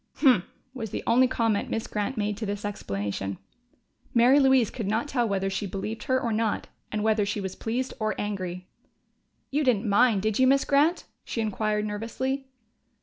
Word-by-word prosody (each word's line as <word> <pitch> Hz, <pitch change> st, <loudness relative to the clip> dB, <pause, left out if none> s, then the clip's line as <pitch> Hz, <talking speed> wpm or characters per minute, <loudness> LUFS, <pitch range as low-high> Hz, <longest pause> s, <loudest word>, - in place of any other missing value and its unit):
"Humph!" 250 Hz, -, +4 dB, 0.3 s
was 225 Hz, -5 st, -5 dB
the -, -, -4 dB
only 250 Hz, +3 st, +5 dB
comment 225 Hz, -4 st, 0 dB
Miss 225 Hz, -, -2 dB
Grant 210 Hz, +4 st, -3 dB
made 210 Hz, 0 st, 0 dB
to 220 Hz, -, -3 dB
this 205 Hz, 0 st, -3 dB
explanation. 100 Hz, -, -3 dB, 0.8 s
Mary 245 Hz, +4 st, +6 dB
Louise 265 Hz, -4 st, +4 dB
could 225 Hz, -6 st, -4 dB
not 220 Hz, +7 st, 0 dB
tell 240 Hz, -5 st, 0 dB
whether 195 Hz, -1 st, 0 dB
she 195 Hz, +1 st, -2 dB
believed 205 Hz, +4 st, -5 dB
her 260 Hz, 0 st, +2 dB
or 235 Hz, -3 st, -1 dB
not 220 Hz, -1 st, 0 dB, 0.2 s
and 210 Hz, -1 st, -1 dB
whether 220 Hz, -1 st, +3 dB
she 205 Hz, +1 st, -2 dB
was 190 Hz, -2 st, -4 dB
pleased 250 Hz, +3 st, -2 dB
or 215 Hz, -1 st, -1 dB
angry. 185 Hz, -3 st, -4 dB, 0.8 s
"You 295 Hz, +2 st, +1 dB
didn't 235 Hz, -5 st, +2 dB
mind, 205 Hz, 0 st, +4 dB
did 215 Hz, +1 st, 0 dB
you, 260 Hz, -, +5 dB
Miss 275 Hz, +1 st, +4 dB
Grant?" 295 Hz, +5 st, +3 dB, 0.2 s
she -, -, -4 dB
inquired 215 Hz, -1 st, 0 dB
nervously. 260 Hz, +6 st, -3 dB
220 Hz, 180 wpm, -27 LUFS, 205-255 Hz, 0.8 s, Mary